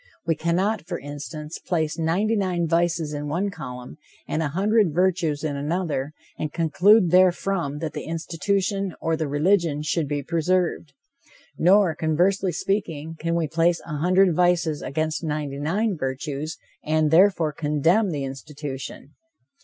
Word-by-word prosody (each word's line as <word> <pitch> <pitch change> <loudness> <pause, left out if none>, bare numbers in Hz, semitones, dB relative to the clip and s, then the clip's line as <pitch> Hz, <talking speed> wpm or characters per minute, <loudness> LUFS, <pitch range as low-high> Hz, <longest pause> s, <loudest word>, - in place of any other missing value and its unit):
We 165 - +2
cannot, 175 +4 -1
for - - -3
instance, 145 +2 -7
place 160 -3 -2
ninety 185 +8 +1
nine 180 -4 0
vices 165 -2 0
in 145 0 -4
one 180 +7 -1
column, 125 -7 -8 0.3
and 155 - -1
a 155 - 0
hundred 195 +2 +2
virtues 175 -5 +1
in 150 -2 -2
another, 150 -1 -2 0.3
and 155 - -2
conclude 175 +4 +4
therefrom 180 -4 +2
that 155 -2 -3
the - - -5
institution 190 +3 -1
or 165 0 0
the 155 -1 -2
religion 150 0 +1
should 155 0 0
be 145 0 -2
preserved. 170 -1 0 0.6
Nor, 185 0 +4
conversely 175 +5 +1
speaking, 165 -6 -2
can 165 +1 -1
we 165 -2 0
place 165 +2 +2
a 150 -3 -4
hundred 185 +3 +3
vices 175 -3 +2
against 155 +4 -2
ninety 150 -3 -3
nine 195 +8 0
virtues, 140 +2 -4 0.3
and, 155 -1 +1
therefore, 170 -3 +4
condemn, 160 +8 +2
the 145 -5 -3
institution. 135 +1 -7
165 Hz, 145 wpm, -24 LUFS, 150-180 Hz, 0.6 s, conclude